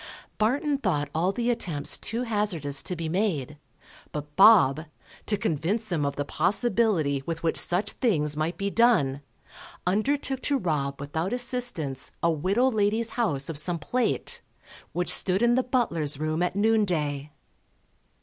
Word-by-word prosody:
Barton 275 +6 +1
thought 150 - -1
all 175 +4 +1
the 240 +3 0
attempts 165 -11 -1
too 235 +2 -3
hazardous 195 - -1
to 180 - -3
be 165 -1 -4
made, 155 - -1 0.5
but 150 0 -7
Bob, 180 -7 +6 0.4
to 210 - +2
convince 195 +6 -1
him 155 -4 0
of 140 - -3
the 145 - -2
possibility 185 - +1
with 165 0 -4
which 165 - +2
such 195 +4 +1
things 150 - 0
might 160 +3 -2
be 200 +1 -2
done, 170 - +3 0.6
undertook 265 +7 0
to 285 - +1
rob 145 - -2
without 160 +8 -3
assistance 245 - -2
a 170 - +4
widow 195 - +1
lady's 220 +1 0
house 145 - -1
of 160 -3 -1
some 170 +2 0
plate, 240 +11 -2 0.5
which 175 0 0
stood 190 +3 +1
in 240 0 +4
the 255 - +3
butler's 170 - 0
room 155 +2 -1
at 180 +1 0
noon 220 +1 +3
day. 150 -6 -2
180 Hz, 150 wpm, -26 LUFS, 150-225 Hz, 0.6 s, Bob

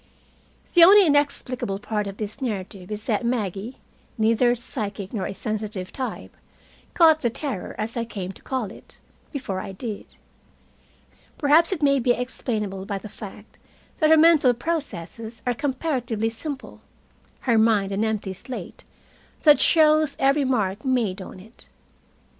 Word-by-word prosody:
The 345 - +8
only 395 +3 +8
inexplicable 280 - 0
part 210 0 -3
of 195 0 -7
this 215 +5 -6
narrative 195 -5 -4
is 210 0 -4
that 220 -2 0
Maggie, 225 -1 -2 0.4
neither 230 +2 +3
a 240 - +3
psychic 210 -4 -5
nor 200 -5 -2
a - - -5
sensitive 215 -4 -4
type, 260 -2 -5 0.6
caught 320 -2 +6
the 240 - +1
terror, 235 -4 -5
as 220 +2 -3
I 235 - -1
came 195 -5 -6
to - - -15
call 255 -7 -3
it, - - -15 0.3
before 255 - -4
I 195 0 -6
did. 215 +1 -6 1.3
Perhaps 310 +4 +4
it 330 -6 -2
may 280 -1 +4
be 245 0 +3
explainable 215 -6 -3
by 200 -2 -2
the 210 +2 -9
fact 210 0 -11 0.4
that 310 - +4
her 320 - +7
mental 305 -6 +5
processes 230 - -5
are 245 - +1
comparatively 250 -4 -1
simple, 275 +4 -7 0.6
her 235 -4 +3
mind 215 -3 +3
an 200 +2 0
empty 215 -3 -2
slate 250 +7 -8 0.6
that 295 -4 +7
shows 310 -2 +4
every 275 +1 +3
mark 210 -5 0
made 235 -8 0
on 185 - -9
it. 220 +5 -15
230 Hz, 150 wpm, -24 LUFS, 205-275 Hz, 1.3 s, The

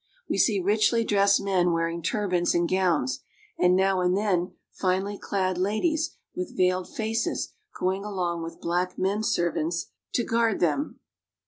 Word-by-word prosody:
We - - -1
see 210 -4 +3
richly 215 +4 +2
dressed 200 -2 +4
men 180 -3 +2
wearing 165 0 -1
turbans 180 -2 0
and 170 0 +2
gowns, 170 -10 +1 0.4
and 180 0 +5
now 190 0 +2
and 180 +1 +2
then 185 -3 0 0.2
finely 190 +2 -1
clad 185 -2 -1
ladies 310 - 0 0.2
with 180 - -5
veiled 185 0 +2
faces 225 0 -2 0.3
going 190 +2 0
along 180 -5 -2
with 165 0 -7
black 180 +2 -1
men 195 +3 0
servants 175 -5 -1 0.2
to 240 - +2
guard 230 -2 +1
them. 180 - 0
185 Hz, 145 wpm, -26 LUFS, 175-205 Hz, 0.4 s, and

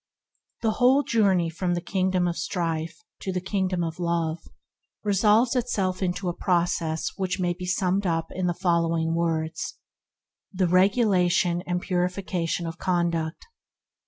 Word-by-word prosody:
/ - - -49
"T" - - +2
S 220 - +2
HE - - -10
whole 260 +3 +5
journey 195 -9 +2
from 175 +2 -1
the - - -1
Kingdom 185 0 0
of 170 - -1
* - - -3
Strife 165 -3 -2 0.2
to 190 - -3
the 180 - -1
Kingdom 185 -1 -1
of 165 +1 -4
Love 170 -1 -1 0.6
resolves 210 +4 +3
itself 195 -7 -1
into 180 0 -1
a 175 - 0
process 170 -3 0
that 190 0 -1
may 175 -1 +1
be 180 +1 -7
summed 190 +1 +1
up 165 -1 -1
in 185 -1 -2
the 175 - 0
following 165 -2 +1
words: 165 -1 -2 0.7
The 185 -2 +1
regulation 185 -2 +3
and 180 0 0
purification 180 -2 -1
of 165 +1 -6
conduct. 170 -3 -1
180 Hz, 160 wpm, -25 LUFS, 170-190 Hz, 0.7 s, whole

